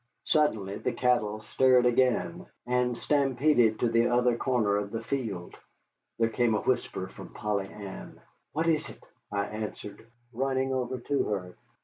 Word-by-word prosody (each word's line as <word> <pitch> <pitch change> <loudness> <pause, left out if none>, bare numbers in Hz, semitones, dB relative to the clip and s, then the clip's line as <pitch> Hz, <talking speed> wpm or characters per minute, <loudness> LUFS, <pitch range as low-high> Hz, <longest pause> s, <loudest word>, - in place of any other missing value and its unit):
Suddenly 110 -11 +1
the - - -1
cattle 110 -4 +1
stirred 125 +3 +4
again, 120 -8 +1 0.2
and 125 -1 +1
stampeded 135 -5 +2
to 120 - +3
the 115 +1 +3
other 120 0 +3
corner 115 -5 +1
of 100 -1 -2
the 115 +1 -5
field. 110 -10 -4 0.6
There 115 - +3
came 115 -1 +1
a - - 0
whisper 110 -7 -1
from - - -12
Polly 105 -3 -1
Ann. 100 -2 -9 0.3
"What 160 +2 -1
is 155 -2 +1
it?" - - -13 0.3
I 100 0 0
answered, 105 -1 -7 0.3
running 130 +2 0
over 130 0 -2
to 140 +3 0
her. 90 -4 -3
120 Hz, 150 wpm, -28 LUFS, 105-130 Hz, 0.6 s, stirred